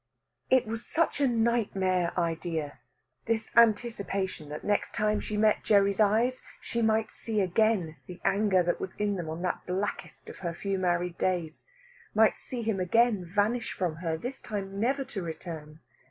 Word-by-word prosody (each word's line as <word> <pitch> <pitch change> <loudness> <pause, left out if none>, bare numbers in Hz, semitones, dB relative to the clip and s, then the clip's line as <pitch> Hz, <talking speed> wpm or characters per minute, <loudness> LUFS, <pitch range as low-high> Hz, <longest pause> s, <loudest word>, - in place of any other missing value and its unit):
It 260 -1 +4
was 225 +1 -4
such 330 -2 0
a 280 - +5
nightmare 200 -7 +1
idea, 165 -3 -2 0.5
this 225 -1 -1
anticipation 205 -7 +2
that 150 - -6
next 205 0 0
time 210 0 +1
she 210 - -4
met 215 0 +3
Gerry's 200 -1 +3
eyes 225 +5 +3 0.2
she 235 - -3
might 220 0 +2
see 220 -2 -3
again 190 -4 +1
the 180 -1 -9
anger 195 -2 +3
that 175 - -1
was 190 - -5
in 205 -1 0
them 170 -4 -4
on 160 +3 -5
that 180 - -1
blackest 190 +3 -4
of - - -9
her 170 -2 -3
few 195 +1 -2
married 175 -1 0
days, 170 -4 -1 0.5
might 220 0 +5
see 245 -2 -5
him 220 -3 0
again 215 +2 +3
vanish 205 +7 0
from 175 -4 -2
her, 165 -2 -2
this 250 +9 -6
time 200 -2 -5
never 270 +5 +1
to 235 -7 -5
return. 160 -2 -7
200 Hz, 170 wpm, -29 LUFS, 175-225 Hz, 0.5 s, a